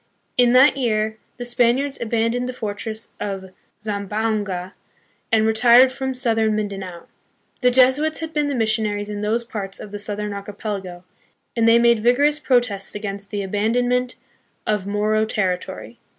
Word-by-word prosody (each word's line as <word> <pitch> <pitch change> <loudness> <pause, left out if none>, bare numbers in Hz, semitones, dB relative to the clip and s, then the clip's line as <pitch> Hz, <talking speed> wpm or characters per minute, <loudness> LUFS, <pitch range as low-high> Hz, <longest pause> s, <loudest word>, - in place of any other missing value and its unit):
In 245 -1 +4
that 265 +3 +6
year 220 -3 0 0.2
the 245 - -5
Spaniards 245 +3 +1
aban 230 0 0
doned 245 +1 -2
the 255 - -4
fortress 220 -1 -5
of 195 -2 -5 0.3
Zamboanga, 205 -2 -2 0.6
and 220 -1 +4
retired 240 +3 +6
from 265 0 -3
south 235 -3 0
ern 220 -1 +2
Mindanao. 195 -4 -5 0.6
The 250 - +5
Jesuits 260 +5 +3
had 320 0 -6
been 300 -1 +1
the 285 - -1
missionaries 215 -2 0
in 205 0 -4
those 220 +3 0
parts 205 -4 -5
of 210 - -9
the 205 - -5
southern 210 0 -3
archipelago, 200 -3 -6 0.5
and 230 -1 +3
they 230 - +7
made 235 -1 +4
vigorous 280 +6 +3
protests 240 -9 0
against 200 -1 -5
the 205 -1 -3
abandonment 245 +5 0 0.5
of 210 -2 -1
Moro 210 +1 +1
terri 190 -4 0
tory. 195 +5 -9
220 Hz, 155 wpm, -21 LUFS, 205-245 Hz, 0.6 s, they